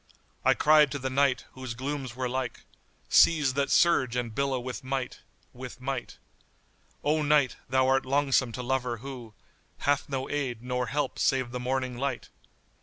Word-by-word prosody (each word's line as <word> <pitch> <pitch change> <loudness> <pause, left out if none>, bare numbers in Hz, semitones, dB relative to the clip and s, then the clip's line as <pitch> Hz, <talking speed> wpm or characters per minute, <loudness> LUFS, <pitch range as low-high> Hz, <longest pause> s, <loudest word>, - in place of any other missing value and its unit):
I - - +4
cried 150 -2 +5
to - - -2
the 130 -1 -3
Night, 135 -1 +2
whose 130 -3 -7
glooms 130 -1 -4
were 130 0 -2
like 125 -1 -3 0.3
* - - -37
Seas 150 -6 +3
that 140 0 0
surge 130 -8 +3
and 120 -2 -2
billow 135 +2 0
with 125 +2 -6
might, 130 -1 -3 0.3
with 125 0 -9
might: 135 +1 -4 0.9
'O 155 +1 +2
Night, 150 -3 +3
thou 130 +1 +3
art 135 0 +3
longsome 135 -2 +2
to 125 - -5
lover 125 -1 -1
who 120 -6 -8 0.2
* - - -38
Hath 145 0 +1
no 135 -2 -2
aid 130 -5 -3
nor 125 0 -2
help 145 -1 -2
save 130 -2 +1
the 125 - -4
morning 130 0 -2
light! 135 -2 -3
130 Hz, 175 wpm, -28 LUFS, 125-140 Hz, 0.9 s, cried